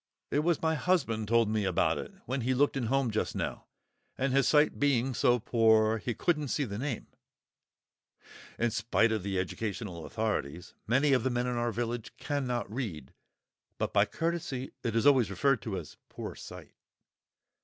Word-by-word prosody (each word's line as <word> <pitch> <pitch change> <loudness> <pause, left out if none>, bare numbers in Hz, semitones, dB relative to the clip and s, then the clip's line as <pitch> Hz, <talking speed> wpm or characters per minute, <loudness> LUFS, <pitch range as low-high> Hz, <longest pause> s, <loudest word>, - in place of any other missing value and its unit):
"It 145 - +2
was 165 +1 +1
my 160 0 +3
husband 145 - 0
told 115 0 +3
me 105 0 0
about 85 -3 +1
it, 215 - -7
when 130 +1 -2
he 130 +2 +1
looked 145 +2 +2
in 125 -4 -1
home 135 -1 +1
just 110 - -1
now, - - -4 0.5
and 135 0 0
his 135 0 +3
sight 150 0 +3
being 135 -2 +2
so 125 0 +3
poor, 110 -1 +3
he 120 +1 -3
couldn't 150 -4 0
see 145 - 0
the 105 -5 -4
name" 135 -3 -3 1.5
(in 120 0 +1
spite 110 +1 +2
of 110 -2 0
the 95 0 -2
Educational 95 -2 -4
Authorities 105 -8 -3
many 135 +5 +3
of 130 - +3
the 130 - 0
men 120 0 0
in 125 -1 -1
our 120 0 0
village 115 -1 -4
cannot 130 -5 -2
read, 95 - -5 0.6
but - - -2
by - - +5
courtesy 165 -6 -3
it 115 -1 -1
is 115 - +2
always 130 -8 +5
referred 120 +5 +1
to 105 -2 -4
as 80 - -8
poor - - -6
sight!) - - -11
120 Hz, 175 wpm, -30 LUFS, 110-135 Hz, 1.5 s, by